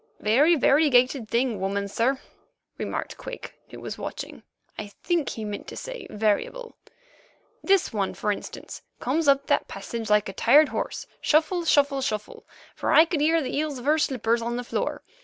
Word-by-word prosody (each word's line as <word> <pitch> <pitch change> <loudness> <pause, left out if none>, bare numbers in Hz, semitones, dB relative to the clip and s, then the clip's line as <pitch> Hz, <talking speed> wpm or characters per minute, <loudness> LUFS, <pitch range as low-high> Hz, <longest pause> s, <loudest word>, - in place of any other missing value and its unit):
"Very 280 +11 +4
variegated 265 -4 +3
thing, 235 -3 0
woman, 200 +1 -1
sir," 245 +6 0 0.6
remarked - - -4
Quick, - - -8 0.2
who - - -10
was - - -7
watching. - - -7 0.3
(I 210 - -6 0.2
think 340 -5 0
he 220 - -5
meant 205 -1 -6
to - - -8
say - - -7
"variable.") 220 - -1 0.9
"This 390 -8 +2
one, 200 -3 -1
for 210 - -1
instance, 205 - -7 0.2
comes 295 +5 0
up 275 0 +4
that - - +1
passage 230 -2 -6
like 210 0 +3
a 195 - -6
tired 295 +9 +5
horse—shuffle, 330 +3 -1
shuffle, 285 -3 +3
shuffle—for 215 -5 -5
I 320 - +7
could 325 -3 -2
hear 320 +1 +3
the 255 - -4
heels 300 -2 -2
of 245 - -9
her 305 +2 +3
slippers 235 -5 +1
on 235 +1 -2
the 245 - -3
floor. - - -3
265 Hz, 165 wpm, -25 LUFS, 220-310 Hz, 0.9 s, I